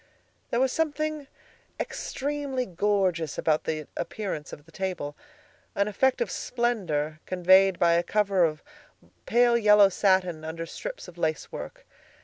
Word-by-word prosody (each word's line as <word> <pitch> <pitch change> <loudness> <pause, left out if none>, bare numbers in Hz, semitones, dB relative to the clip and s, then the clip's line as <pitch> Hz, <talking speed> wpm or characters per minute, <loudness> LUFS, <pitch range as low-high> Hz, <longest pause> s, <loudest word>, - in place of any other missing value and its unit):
There 235 - 0
was 260 0 +2
something 310 -1 -2 0.5
extremely 280 -2 -3
gorgeous 185 -4 0
about 155 -1 +1
the 155 -1 -2
appearance 175 -5 -4
of 145 - -11
the 165 - -19
table, 180 -6 -4 0.6
an 200 +1 +1
effect 260 - +1
of 480 - -1
splendor 175 -12 -1
conveyed 185 +1 +5
by 170 -1 +4
a 170 - +3
cover 195 0 +1
of 155 -2 0 0.6
pale 240 0 +4
yellow 210 -3 +6
satin 185 -4 +1
under 165 +1 -5
strips - - -7
of 175 - -13
lace 155 -3 -1
work. - - -8
190 Hz, 135 wpm, -27 LUFS, 165-240 Hz, 0.6 s, yellow